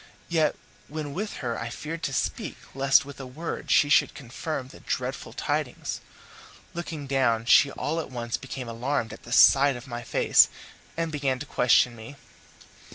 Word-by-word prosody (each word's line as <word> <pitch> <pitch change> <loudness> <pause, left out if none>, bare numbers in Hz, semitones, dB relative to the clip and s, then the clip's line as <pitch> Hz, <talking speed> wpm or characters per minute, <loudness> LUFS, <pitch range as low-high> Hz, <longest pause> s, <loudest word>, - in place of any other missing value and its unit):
Yet 160 -3 +2 0.3
when 150 -1 -5
with 205 +6 -3
her 120 -1 -2
I 115 - -4
feared 160 +7 -6
to - - -9
speak 135 - -2 0.2
lest 135 0 +4
with 140 0 -10
a 135 - -7
word 155 +6 -6
she 145 - +5
should 145 - +4
confirm 135 +1 -5
the - - -13
dreadful - - -4
tidings. - - -3 0.7
Looking 165 -4 -5
down, 125 -5 +1
she 140 +3 +6
all 155 +3 -2
at 160 - -5
once 120 -2 -3
became 135 -1 -6
alarmed 115 +1 -2
at - - -11
the 120 - -12
sight 140 +2 +6
of 120 - -9
my 120 -3 -6
face, 120 - +4 0.5
and 165 -1 -1
began 140 -3 0
to 140 - -7
question 125 -2 +3
me. 115 +5 -10
135 Hz, 170 wpm, -26 LUFS, 120-150 Hz, 0.7 s, she